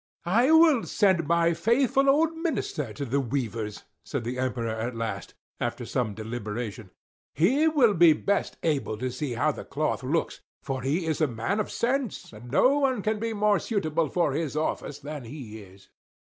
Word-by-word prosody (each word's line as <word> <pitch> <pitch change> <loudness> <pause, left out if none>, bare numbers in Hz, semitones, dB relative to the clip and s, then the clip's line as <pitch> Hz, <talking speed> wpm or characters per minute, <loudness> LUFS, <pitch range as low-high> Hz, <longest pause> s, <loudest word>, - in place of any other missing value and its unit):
"I 230 - +3
will 320 -6 +6
send 190 -7 +2
my 170 0 +3
faithful 255 +9 +2
old 320 +4 +3
minister 255 - -2
to 125 +7 -5
the 135 +3 0
weavers," 115 -5 -3 0.2
said 140 -4 -4
the 125 +2 -4
Emperor 125 -3 -1
at 115 +2 -3
last, 110 -5 -4 0.2
after - - -3
some 110 -5 -2
deliberation, 110 -1 -5 0.5
"he 260 - +3
will 275 -9 +4
be 170 -3 +6
best 200 +6 -1
able 140 -9 0
to 130 +3 -3
see 130 +1 -3
how 140 +6 +1
the - - -8
cloth 150 +2 -2
looks; 145 +6 -2 0.2
for 135 -2 -3
he 150 +7 -1
is 160 0 -1
a 155 - +4
man 125 - -2
of 215 - -1
sense, 250 - -2
and 115 +3 -11
no 260 - +4
one 260 -7 +1
can 215 0 0
be 225 +1 -2
more 210 -1 +2
suitable 165 -8 -1
for 170 -5 +1
his 155 -1 -2
office 155 -2 -2
than 145 -1 -7
he 115 -3 -8
is." 95 0 -17
155 Hz, 180 wpm, -27 LUFS, -, 0.5 s, will